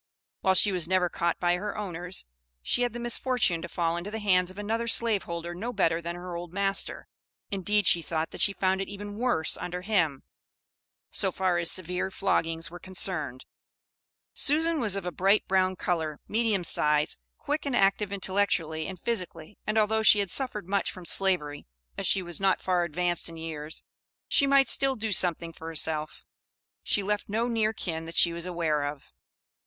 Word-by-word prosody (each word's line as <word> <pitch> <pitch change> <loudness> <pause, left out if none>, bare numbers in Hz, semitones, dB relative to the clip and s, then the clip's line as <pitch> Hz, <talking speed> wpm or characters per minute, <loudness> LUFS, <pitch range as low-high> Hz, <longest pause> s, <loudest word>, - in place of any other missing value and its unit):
While 190 0 +2
she 200 +3 +5
was 180 -3 0
never 185 -1 +2
caught 170 0 -1
by 175 0 +2
her 205 +2 -5
owners, 180 -3 -6 0.4
she 245 - +1
had 245 -2 0
the 240 - -5
misfortune 240 -7 0
to - - -7
fall 170 -1 -1
into 175 +4 -5
the 220 - -5
hands 185 -4 +2
of 185 - -10
another 225 +3 -2
slaveholder 180 -8 0
no 220 +8 -4
better 165 -7 +1
than 170 +1 -5
her 175 0 -7
old 170 0 -6
master, 195 +1 -1 0.4
indeed 205 +1 0
she 170 - +5
thought 160 0 -3
that - - -4
she 200 - +5
found 190 0 0
it 195 - -4
even 205 +1 -8
worse 240 -11 +2
under 180 +1 -5
him, 175 -9 0 0.9
so - - +2
far 185 -2 0
as 170 - +1
severe 180 +1 -1
floggings 165 -4 -1
were 175 - -9
concerned. 175 -8 -1 0.9
Susan 320 +2 +3
was 215 -6 0
of 195 - -4
a 180 - -2
bright 195 +4 +2
brown 185 0 +2
color, 160 -4 -2
medium 215 -4 +1
size, 150 - +2 0.2
quick 300 +1 -3
and 270 - -1
active 195 -1 +2
intellectually 185 -5 0
and 185 -2 -7
physically, 180 -5 -4
and 215 +1 0
although 220 +1 +2
she 220 - +7
had 200 -3 -1
suffered 215 -8 -1
much 200 0 0
from 185 -2 -11
Slavery, 170 -7 +1 0.3
as - - 0
she 195 - +4
was 175 +1 -2
not 195 -1 +2
far 180 -2 +1
advanced 175 +1 0
in 165 - -10
years, 160 -1 -6 0.4
she 280 - +4
might 275 -1 +5
still 270 +1 +4
do 220 -1 -3
something 170 -3 +3
for 160 - -10
herself. 155 -1 -3 0.6
She 205 - +1
left 210 +1 -2
no 225 +3 0
near 225 -2 +1
kin 165 -6 -4
that 165 - -7
she 170 - +6
was 170 +1 -4
aware 160 -5 -1
of. 145 -1 -7
185 Hz, 185 wpm, -27 LUFS, 170-210 Hz, 0.9 s, she